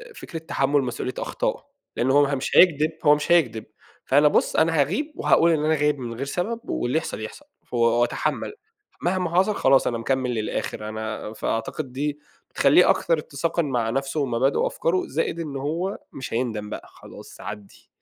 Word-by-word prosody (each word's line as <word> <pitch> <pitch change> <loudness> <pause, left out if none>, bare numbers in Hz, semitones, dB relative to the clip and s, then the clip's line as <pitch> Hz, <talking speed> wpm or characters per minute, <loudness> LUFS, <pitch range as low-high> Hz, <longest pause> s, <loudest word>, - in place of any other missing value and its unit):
فكرة 165 - -7
تحمُّل 145 -3 +1
مسؤولية 125 0 -3
أخطائه، - - -3 0.3
لأنه 130 +2 +2
هو 145 -1 +4
مش 130 - -2
هيكدب 155 -3 +5
هو 150 0 +7
مش 150 +3 -3
هيكدب، 120 -11 +3 0.4
فأنا 145 +2 +5
بُص - - +2
أنا 165 +1 +3
هأغيب 200 - 0
وهاقول 170 +1 +4
إن 155 -1 +1
أنا 160 0 +3
غايب 150 -1 +1
من 120 -2 -5
غير 135 +4 -4
سبب، 195 +10 -2
واللي 125 +6 0
يحصل 160 - -3
يحصل 290 - -8 0.2
ف - - -21
وأتحمل 120 - +1 0.5
مهما 180 -1 0
حصل 200 +2 +3
خلاص 135 0 +4
أنا 120 - -1
مكمّل 130 +2 -1
للآخر. 110 -1 -3
أنا 110 0 -5
فأعتقد 115 +5 -3
دي 145 +2 -2 0.3
بتخليه - - +5
أكثر 165 - +2
اتساقًا 160 +4 -2
مع 120 -6 -1
نفسه 135 +4 -2
ومبادئه 135 0 +1
وأفكاره 180 +3 0
زائد 165 +3 -2
إنه 145 -4 -4
هو 170 +7 -2 0.2
مش 130 -4 -7
هيندم 110 -4 -2
بقى - - -7
خلاص - - -13
عدّي. 105 -2 -9
140 Hz, 170 wpm, -24 LUFS, 120-160 Hz, 0.5 s, هو